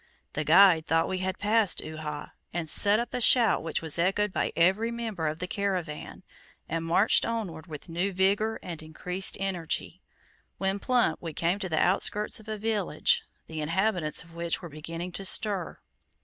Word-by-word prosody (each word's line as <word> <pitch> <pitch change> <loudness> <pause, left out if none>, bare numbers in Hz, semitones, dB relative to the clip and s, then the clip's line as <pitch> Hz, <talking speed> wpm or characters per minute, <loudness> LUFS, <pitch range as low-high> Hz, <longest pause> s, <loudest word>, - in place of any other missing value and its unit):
The - - -1
guide 180 -5 +6
thought 165 0 +2
we 185 - -2
had 185 0 -2
passed 210 -1 +2
Uhha, 155 -1 -6 0.2
and 170 -1 -3
set 205 +6 +4
up 240 - -4
a 250 - -1
shout 235 -2 +5
which 165 0 -3
was 160 +1 -3
echoed 195 +3 +1
by - - 0
every 190 +7 +3
member 225 -8 -3
of 155 +1 -2
the 180 - -3
caravan, 180 -6 -3 0.4
and 165 0 -2
marched 175 +6 +4
onward 195 -8 -3
with 150 -3 -9
new 175 +4 -1
vigor 200 +4 +1
and 170 -3 -6
increased 180 +4 -1
energy, 185 -1 -3 0.6
when 195 +1 -1
plump 245 +3 +1
we 165 -2 -5
came 170 +6 0
to 190 -3 -3
the 160 - -1
outskirts 205 +4 +1
of 215 - -16
a 215 0 -3
village, 210 -7 +1 0.2
the 160 -1 -6
inhabitants 170 0 0
of 165 0 -17
which 170 0 -2
were 175 - -8
beginning 165 +4 -6
to 195 - -6
stir. 195 -2 0
185 Hz, 175 wpm, -28 LUFS, 165-205 Hz, 0.6 s, guide